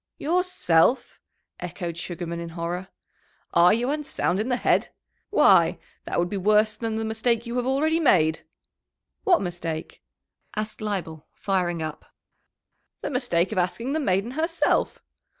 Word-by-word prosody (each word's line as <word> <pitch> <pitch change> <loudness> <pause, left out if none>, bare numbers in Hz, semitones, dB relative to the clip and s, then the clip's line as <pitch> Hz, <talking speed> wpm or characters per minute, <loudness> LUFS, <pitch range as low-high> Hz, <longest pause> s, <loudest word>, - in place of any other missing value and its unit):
"Yourself!" 300 - +1 0.4
echoed 170 -3 -5
Sugarman, 170 0 -5
in 170 0 -6
horror. 175 +2 -3 0.7
"Are 175 +1 +6
you 240 +5 +1
unsound 295 -10 -1
in 220 +4 -1
the 250 - +2
head? - - +1 0.4
Why, - - +5 0.3
that - - -3
would 175 - +2
be 200 - -4
worse 215 +2 +3
than 225 0 -3
the 220 0 -2
mistake 225 +1 0
you 235 +1 -5
have 245 0 -1
already 310 +5 +2
made!" 165 - +3 0.9
"What 360 - +4
mistake?" 170 -3 -5 0.5
asked 215 0 -4
Leibel, 175 -7 -4
firing 175 -4 -1
up. 155 -1 -6 1.0
"The - - -3
mistake 245 -10 +1
of - - 0
asking 230 +9 -1
the 315 - 0
maiden 200 -3 0
herself. 330 +4 0
210 Hz, 140 wpm, -25 LUFS, 175-250 Hz, 1.0 s, Are